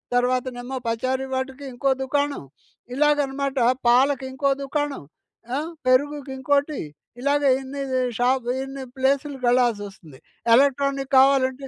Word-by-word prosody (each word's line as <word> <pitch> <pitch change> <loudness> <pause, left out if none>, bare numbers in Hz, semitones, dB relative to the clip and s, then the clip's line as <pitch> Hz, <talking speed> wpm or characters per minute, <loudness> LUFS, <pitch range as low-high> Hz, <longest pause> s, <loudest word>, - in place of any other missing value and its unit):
తర్వాతనేమో 250 +1 -1
పచారీ 255 +3 -1
వాటికి 260 +1 -4
ఇంకో 275 +3 0
దుకాణం. 285 - -1 0.5
ఇలాగనమాట. 280 -1 +1 0.3
పాలకి 265 +2 +3
ఇంకో 275 +1 +1
దుకాణం. 290 - -3 0.5
ఆహ్, 315 +3 -4 0.2
పెరుగుకి 285 +2 +1
ఇంకోటి 285 +2 0 0.4
ఇలాగ 285 +2 +1 0.2
ఎన్ని 275 +1 -6 0.4
షాప్, 250 0 +1 0.2
ఇన్ని 270 0 -7
ప్లేసులుకి 270 0 0
వెళ్ళాల్సి 240 -4 +2
వస్తుంది. 160 -8 -16 0.4
ఎలక్ట్రానిక్ 275 +1 +1
కావాలంటే 265 0 +3
270 Hz, 110 wpm, -23 LUFS, 255-280 Hz, 0.5 s, పాలకి